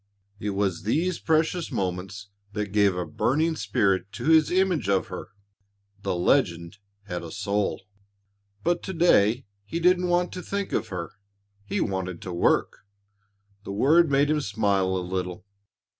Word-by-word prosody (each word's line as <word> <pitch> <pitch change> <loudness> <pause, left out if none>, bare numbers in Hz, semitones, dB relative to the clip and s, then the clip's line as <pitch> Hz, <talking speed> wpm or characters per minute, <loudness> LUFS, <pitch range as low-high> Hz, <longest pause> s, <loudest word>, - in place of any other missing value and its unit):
It 105 - -3
was 95 -4 0
these 165 - 0
precious 160 +2 +1
moments 95 +2 -4 0.2
that 105 -1 -3
gave 100 -2 +3
a 90 -1 -2
burning 160 +6 0
spirit 100 -7 0
to - - -6
his 160 -2 +5
image 180 - +1
of 95 -1 +1
her. - - -6 0.7
The - - -1
legend 85 -2 +1 0.2
had 90 -3 -5
a 85 - -8
soul. 100 +2 -2 0.8
But 175 0 +1
to 190 - -5
day 125 - +4 0.2
he 165 +11 -4
didn't 180 +1 +3
want 175 0 +1
to 180 - -6
think 200 +1 -3
of - - 0
her. 85 -3 -5 0.5
He - - -2
wanted 90 -2 -2
to 90 - -5
work. 85 - +2 0.9
The 100 - -6
word 155 +10 +4
made 140 +1 +3
him 150 -1 +1
smile 100 -4 +1
a 90 - -3
little. 90 +1 -4
105 Hz, 155 wpm, -26 LUFS, -, 0.9 s, his